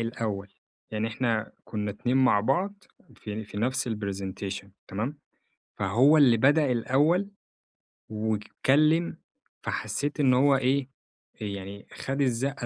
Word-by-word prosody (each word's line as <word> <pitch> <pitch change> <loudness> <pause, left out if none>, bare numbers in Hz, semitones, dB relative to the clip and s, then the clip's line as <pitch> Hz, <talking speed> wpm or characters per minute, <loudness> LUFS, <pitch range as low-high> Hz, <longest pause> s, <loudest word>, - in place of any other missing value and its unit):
الأوّل، 110 -4 -3 0.4
يعني 110 +1 -1
إحنا 115 -1 -1
كنّا 105 -1 -3
اتنين 120 +5 -1
مع 130 -6 +4
بعض، 190 - -1 0.3
في 110 +1 -6
في 105 - -11
نفس 125 +3 0
الpresentation 100 -2 -4 0.2
تمام؟ 120 +9 -3 0.6
فهو 125 +11 +4
اللي 130 -6 +6
بدأ 145 +3 +4
الأوّل 150 - +2 0.8
واتكلم، 130 +10 +1 0.5
فحسيت 140 +8 -3
إن 135 -3 +4
هو 135 +2 +5
إيه، 135 +1 +1 0.5
يعني 100 -1 -6
خَد 135 +2 -3
الزقة 135 +1 0
120 Hz, 115 wpm, -27 LUFS, 105-140 Hz, 0.8 s, اللي